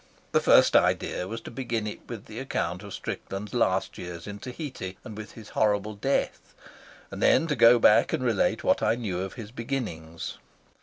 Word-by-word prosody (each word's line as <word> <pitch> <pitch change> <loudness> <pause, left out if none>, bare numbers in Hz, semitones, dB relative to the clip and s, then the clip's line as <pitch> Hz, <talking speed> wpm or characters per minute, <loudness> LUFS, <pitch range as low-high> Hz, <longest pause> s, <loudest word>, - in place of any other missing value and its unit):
My - - +5
first - - +5
idea 90 - +2
was 115 +2 -5
to - - -9
begin 115 -3 -2
it 105 - -5
with 115 -4 -7
the 110 +2 -8
account 90 -9 -2
of 100 -1 -10
Strickland's 100 +2 -5
last 95 -6 +1
years 85 -1 -7
in 105 0 -7
Tahiti 125 - -6
and 110 - -8
with 110 0 -8
his 110 -2 -11
horrible 105 0 +1
death, 135 +7 -2 0.6
and - - -6
then - - +5
to 150 -2 0
go 120 -1 +7
back 105 -2 +5
and - - -1
relate 115 -5 +1
what - - +3
I - - +3
knew 105 -7 -3
of 95 0 -4
his 115 -3 -8
beginnings. 110 -11 -5
110 Hz, 190 wpm, -27 LUFS, 95-120 Hz, 0.6 s, go